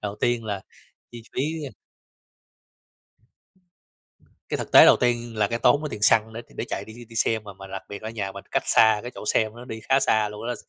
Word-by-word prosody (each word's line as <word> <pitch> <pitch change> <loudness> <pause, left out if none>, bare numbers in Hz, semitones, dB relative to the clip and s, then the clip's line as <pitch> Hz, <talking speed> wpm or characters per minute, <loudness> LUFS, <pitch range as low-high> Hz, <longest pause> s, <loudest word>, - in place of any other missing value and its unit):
Đầu 105 0 -4
tiên 120 -1 0
là 100 -3 -4 0.5
chi 120 -1 -9
phí, 130 - -1 0.2
ờ - - -7 2.8
cái - - -2
thực - - -6
tế - - +10
đầu - - +7
tiên 120 -2 -1
là 105 -1 +2
cái 115 - -2
tốn 125 +5 +3
ở 150 - -3
tiền 105 - -7
xăng 110 +1 +4
nữa 115 - -6
để - - -20
để - - -3
chạy - - -4
đi 110 - -12
đi 120 - -11
đi 115 0 -13
xem, 110 0 +2
mà 100 - -9
mà 95 0 -12
đặc 95 0 -7
biệt 100 +1 -8
ở 110 - -5
nhà 100 -4 -4
mình 100 0 -10
cách - - 0
xa 110 -1 +5
cái 120 - -6
chỗ - - -9
xem 110 0 +1
nữa 120 - -10
đi 110 -1 -6
khá 135 +1 +4
xa 110 -4 +2
luôn 105 +2 -8
đó. 120 - -1
110 Hz, 240 wpm, -24 LUFS, 105-120 Hz, 2.8 s, tế